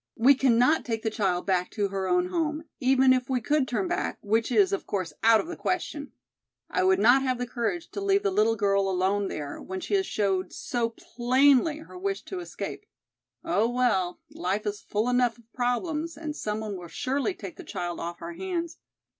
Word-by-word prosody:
"We 255 +5 +7
cannot 260 +3 +3
take 225 -4 -3
the 220 - 0
child 190 -5 0
back 185 -2 +1
to 205 -2 0
her 190 -1 -2
own 360 0 +2
home, 320 -3 -1 0.2
even 260 0 +5
if 255 -1 -1
we 260 -1 +1
could 290 +3 +1
turn 210 -7 -1
back, - - -2
which 225 +3 +1
is 205 -5 +4
of 195 - -2
course 185 -6 -2
out 225 0 +6
of - - -2
the 345 +1 -6
question. 295 -7 -3 0.6
I - - +1
would 190 0 +4
not 245 +7 +5
have 255 -2 0
the 245 - -2
courage 255 +9 -3
to 400 - -5
leave 395 0 +2
the 405 - +1
little 225 - +3
girl 200 -2 +2
alone 190 +2 +1
there, 145 -4 -5
when 190 0 -5
she - - -5
has 385 -1 +2
showed 190 -3 0
so 235 -2 -1
plainly 260 +6 +2
her 360 +3 -11
wish 390 +1 -2
to 375 - -6
escape. 350 - -6 0.6
Oh, 230 -9 +2
well, 235 -8 +1
life 195 +4 -2
is 205 0 -3
full 210 +3 -1
enough 245 -2 +2
of 230 -1 -23
problems 300 +7 -1
and 305 -1 -5
some 215 -6 -3
one 210 -3 -4
will 175 -1 -9
surely 275 - -1
take - - -9
the 370 - -9
child 175 - -4
off 170 0 -6
our 170 +1 -5
hands! 340 - -4
240 Hz, 205 wpm, -27 LUFS, 200-300 Hz, 0.6 s, We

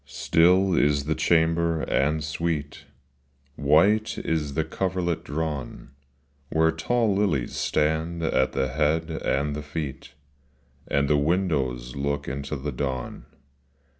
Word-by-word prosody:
Still 90 +3 +3
is 70 -1 +2
the 80 +2 0
chamber 80 0 +2
and 75 +3 +1
sweet, 80 -1 -3 0.7
White 100 +10 +3
is 75 -3 -2
the 80 - +1
coverlet 90 -1 -2
drawn, 75 -4 -4 0.6
Where 80 +1 +3
tall 110 +7 +1
lilies 95 -11 0
stand 80 +2 0
at 65 -4 +1
the 65 -1 0
head 80 +4 0
and 75 -2 -1
the 75 - -4
feet, 75 -3 -6 0.7
And 70 0 +1
the 75 0 +3
windows 70 -7 0
look 70 +1 -2
into 70 +2 -4
the 70 +2 -4
dawn. 65 -1 -4
75 Hz, 120 wpm, -25 LUFS, 70-85 Hz, 0.7 s, Still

